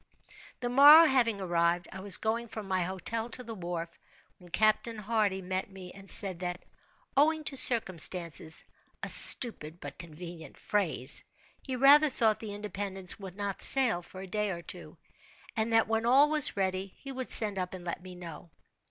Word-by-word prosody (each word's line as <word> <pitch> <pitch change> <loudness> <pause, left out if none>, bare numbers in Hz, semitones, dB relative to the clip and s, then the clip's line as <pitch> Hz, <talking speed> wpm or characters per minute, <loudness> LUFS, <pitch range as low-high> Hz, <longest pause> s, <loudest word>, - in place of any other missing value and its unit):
The 245 - -3
morrow 290 +6 +7
having 240 -8 0
arrived, 175 -1 -1
I 190 - -9
was 195 0 +2
going 230 +2 -3
from 215 -2 -9
my 185 -1 -2
hotel 190 +6 -4
to 250 - -9
the 230 -1 -9
wharf, 170 -3 -7 0.4
when 180 -1 -17
Captain 215 +4 0
Hardy 210 -3 -2
met 185 +1 -5
me 190 -2 -12
and 195 -1 -15
said 190 -4 -1
that, 180 -1 -6 0.5
"owing 310 +3 +1
to 285 - -1
circumstances" 175 - +2 0.4
(a - - -3
stupid 170 - +2
but 145 -3 -11
convenient 170 -1 -11
phrase), 160 -10 0 0.4
"he 260 - -6
rather 285 +4 +5
thought 225 -5 0
the 215 -2 -8
'Independence' 200 -2 -3
would 190 -2 -11
not 200 -1 -6
sail 250 -10 +5
for 185 +2 -13
a - - -8
day 210 +2 -3
or 170 -2 -7
two, - - -9 0.6
and 225 0 -2
that 225 0 +2
when 225 +1 -2
all 280 +5 +4
was 305 -7 +1
ready, 190 0 -3
he 275 - -10
would 260 -1 -7
send 205 -3 +7
up 180 0 -5
and 180 -1 -12
let 170 0 -6
me 185 0 -12
know." 170 -1 -11
195 Hz, 180 wpm, -28 LUFS, 180-230 Hz, 0.6 s, morrow